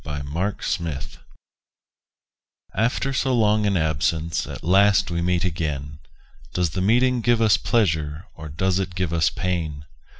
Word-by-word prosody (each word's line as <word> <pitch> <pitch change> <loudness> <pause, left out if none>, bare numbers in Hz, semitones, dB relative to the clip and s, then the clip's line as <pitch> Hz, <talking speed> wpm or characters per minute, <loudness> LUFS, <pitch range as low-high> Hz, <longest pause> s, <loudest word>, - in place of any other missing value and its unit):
THE 70 -1 -5
MEETING 85 -1 -2 1.8
After 120 +5 0
so 130 -1 +1
long 105 -2 +3
an 100 -2 +2
absence 80 +1 0
At - - -8
last 95 +2 +4
we 85 0 -1
meet 90 +1 +1
again: 75 -4 -3 0.6
Does 90 -3 +1
the 95 - -2
meeting 120 +5 +3
give 120 0 +2
us 110 -2 +5
pleasure, 80 -8 0
Or 80 -1 -9
does 95 +5 0
it 90 -2 -4
give 90 -3 -1
us 80 -3 +3
pain? 80 -5 -3
90 Hz, 140 wpm, -23 LUFS, 80-105 Hz, 1.8 s, us